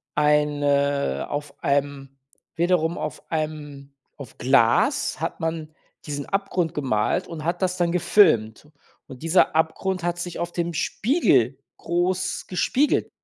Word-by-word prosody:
eine 145 - +1
auf 145 -1 -6
einem 140 -1 -1 0.4
wiederum 170 -1 +1
auf 155 - -6
einem 145 -3 -4 0.2
auf 140 -5 -11
Glas 125 -3 +2
hat - - -3
man 160 -1 -4 0.3
diesen 145 -2 -4
Abgrund 190 -4 -1
gemalt 125 -9 0
und 155 -2 -7
hat 175 +2 -1
das 185 0 0
dann 175 -1 +1
gefilmt. 155 - +3 0.4
Und 130 +1 -11
dieser 165 -1 +3
Abgrund 175 +3 0
hat 175 0 -1
sich 175 -1 -5
auf 175 0 -3
dem 170 0 -2
Spiegel 145 - +1 0.2
groß 175 +2 -1
gespiegelt. 260 +10 +1
155 Hz, 125 wpm, -24 LUFS, 140-175 Hz, 0.4 s, gefilmt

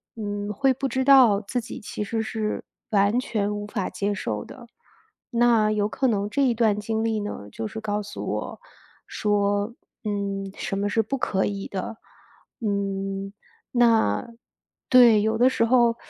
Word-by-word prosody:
嗯， 205 -2 -4
会 260 +6 +2
不 270 +2 -2
知 260 0 -1
道 255 -7 +7
自 220 +4 -3
己 225 - -8
其 210 - -5
实 225 +2 -2
是 220 -1 -3 0.3
完 205 +2 +3
全 210 -4 -1
无 205 0 -5
法 205 -3 -3
接 205 +1 -1
受 105 - -3
的。 250 -3 -12 0.6
那 235 -3 +3
有 210 -1 +1
可 265 +4 0
能 205 -3 0
这 280 - 0
一 245 -3 +2
段 215 -3 +2
经 220 +1 -2
历 225 -1 0
呢， 205 - -6
就 110 +1 -4
是 220 - -7
告 210 -1 -2
诉 205 0 -7
我 - - -4 0.5
说， 205 +1 0 0.3
嗯， 200 -1 -2
什 - - -3
么 205 - 0
是 225 +2 +2
不 245 +6 -3
可 190 -5 0
以 200 -1 -3
的。 195 +3 -5 0.6
嗯， 195 -1 -2 0.4
那 230 - +3 0.6
对。 240 -4 +7
有 220 +1 +1
的 250 +2 +5
时 230 - +1
候， 235 -1 +4
210 Hz, 180 characters per minute, -25 LUFS, 200-230 Hz, 0.6 s, 道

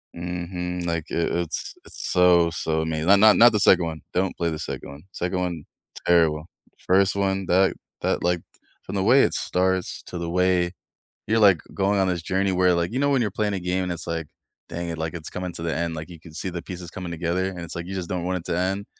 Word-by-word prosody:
Mhm, 90 0 -4
like 85 -2 -2
it 85 - 0
it's 85 -1 -3
it's - - -7
so, 90 -2 +5
so 80 -1 -1
amazing, 80 0 -2
not 100 +1 +7
not, 110 0 +7
not 120 0 +8
the 105 - +1
2nd 90 -3 +5
one, 80 -1 -5
don't 95 +1 0
play 85 -1 0
the 75 - -4
2nd - - -5
one. 70 +2 -11
2nd 90 0 -2
one, 90 -4 -3 0.4
terrible. 80 -3 +3 0.4
First 95 +1 +3
one 95 -1 0
that 95 +2 +4 0.3
that, - - 0
like, 90 -1 +1 0.4
from - - -6
the 95 - +1
way 125 +7 +6
it - - +1
starts 95 0 -1
to 90 - -6
the 85 -1 -3
way 90 0 +2 0.6
you're, 110 +1 +2
like, 100 -6 +6
going 100 +1 +1
on 95 - +2
this 90 -2 -1
journey 95 +2 0
where, 90 0 +3
like 85 +1 0
you 125 - -2
know, 140 +1 +2
when 135 -3 +3
you're 110 - +1
playing 105 +1 -1
a 95 - -2
game 90 +1 -1
and 90 - -2
it's, 85 - -6
like, 85 -2 -3 0.4
dang 85 0 -4
it, 85 - -4
like, 80 +1 -3
it's 80 -3 -7
coming 90 -1 -4
to - - -8
the 85 -1 -2
end, 85 -1 -2
like, 80 +2 -7
you 85 -2 -11
can 80 -1 -14
see 90 +3 -4
the 85 -1 -5
pieces 90 -2 -7
coming 90 0 -6
together, 85 +3 -1
and 90 -2 -8
it's, 85 - -7
like, 85 0 -4
you 95 - -6
just 90 -2 -4
don't 90 -2 -2
want 90 0 0
it 85 - -14
to 85 - 0
end. 95 +3 -1
90 Hz, 250 wpm, -24 LUFS, 85-95 Hz, 0.6 s, not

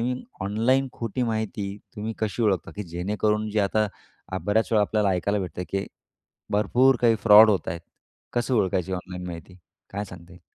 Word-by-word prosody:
मी 125 +2 -2 0.2
online 115 +7 +1
खोटी 115 +1 -3
माहिती 110 -3 -2 0.2
तुम्ही 110 +2 -3
कशी 110 +1 -1
ओळखता? 100 -5 +1
की 105 - -3
जेणेकरून 105 +5 -1
जे 105 0 +1
आता 105 +2 +2 0.5
अ, - - -1
बऱ्याचवेळा 110 +1 +2
आपल्याला 105 0 +1
ऐकायला 100 +3 0
भेटतं, 90 -1 -5
की 95 0 -2 0.7
भरपूर 120 +6 +4
काही 115 -2 +4
फ्रॉड 110 0 +9
होत 100 - 0
आहेत, 85 - -3 0.5
कसं 120 +2 0
ओळखायची 95 -4 +1
ऑनलाईन 90 0 -5
माहिती? 90 +1 -9 0.3
काय 100 +1 -3
सांगता 90 -3 -12
येईल? 90 0 -16
105 Hz, 165 wpm, -25 LUFS, 95-110 Hz, 0.7 s, फ्रॉड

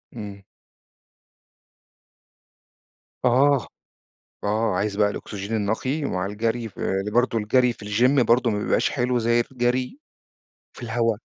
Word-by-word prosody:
إمم. 100 -3 -8 2.8
آه، 135 +2 +3 0.8
آه، 105 0 +1
عايز 100 +1 -1
بقى 105 -1 +3
الأوكسجين 105 +1 -5
النقي 110 +8 -1
مع 95 -8 -2
الجري، 115 +3 -2
ف - - -20
ل 95 +2 -1
برضه 120 0 +2
الجري 125 +3 +2
في 110 - -13
الgym 125 +6 +3
برضه 120 +1 +3
ما 105 - -1
بيبقاش 105 - +1
حلو 125 -1 0
زي 120 +1 +2
الجري 125 - -1 0.8
في - - -11
الهوا. 115 -1 0
115 Hz, 120 wpm, -24 LUFS, 105-125 Hz, 2.8 s, آه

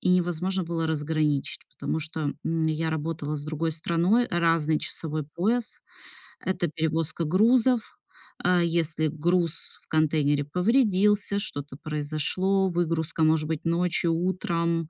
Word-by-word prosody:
и - - -1
невозможно 180 +1 +1
было 165 -1 -2
разграничить, 150 -2 -1
потому 160 - -3
что, 155 -2 -3
м, 160 0 0
я 160 +1 0
работала 155 -1 -3
с 145 - -7
другой 160 +1 -2
страной, 175 +9 +2
разный 165 -3 +2
часовой 155 -1 -4
пояс, 210 +11 -1 0.6
это 175 -3 -1
перевозка 160 +1 -1
грузов. 230 +7 +3 0.5
А, 180 0 +4
если 165 -2 +1
груз 165 +1 -1
в - - -31
контейнере 150 -2 +2
повредился, 205 - +2
что-то 145 -9 -5
произошло, 155 +6 0
выгрузка 165 -2 0
может 155 -1 +3
быть 160 0 -3
ночью, 170 0 +1
утром, 170 -2 -1
165 Hz, 125 wpm, -26 LUFS, 155-180 Hz, 0.6 s, А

